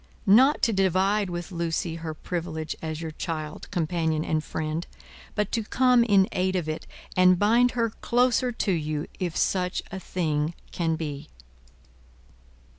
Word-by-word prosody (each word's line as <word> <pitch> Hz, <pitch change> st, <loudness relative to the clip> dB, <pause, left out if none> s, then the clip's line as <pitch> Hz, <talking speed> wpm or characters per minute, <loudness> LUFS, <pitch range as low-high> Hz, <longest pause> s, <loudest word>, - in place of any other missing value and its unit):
Not 255 Hz, +9 st, +5 dB
to 230 Hz, -, +3 dB
divide 195 Hz, +1 st, +2 dB
with 175 Hz, +2 st, -5 dB
Lucie 170 Hz, 0 st, -2 dB
her 160 Hz, -1 st, -5 dB
privilege 160 Hz, -2 st, -4 dB
as 160 Hz, 0 st, -4 dB
your 160 Hz, -, -4 dB
child, 155 Hz, -1 st, -5 dB
companion, 160 Hz, -3 st, 0 dB
and 155 Hz, -1 st, 0 dB
friend; 155 Hz, +2 st, -3 dB, 0.5 s
but 210 Hz, -1 st, 0 dB
to 225 Hz, -, 0 dB
come 250 Hz, +2 st, +4 dB
in 200 Hz, -4 st, +4 dB
aid 185 Hz, +1 st, 0 dB
of 175 Hz, -4 st, -1 dB
it, 155 Hz, 0 st, -4 dB, 0.3 s
and 185 Hz, 0 st, +6 dB
bind 235 Hz, +5 st, +4 dB
her 230 Hz, -2 st, +1 dB
closer 245 Hz, +2 st, +1 dB
to 225 Hz, -3 st, -1 dB
you, 155 Hz, -3 st, -1 dB
if 175 Hz, -3 st, -2 dB
such 180 Hz, -1 st, 0 dB
a 190 Hz, -, -5 dB
thing 160 Hz, -3 st, -1 dB, 0.2 s
can 165 Hz, -2 st, 0 dB
be." 150 Hz, -2 st, -5 dB
175 Hz, 150 wpm, -26 LUFS, 160-205 Hz, 0.5 s, and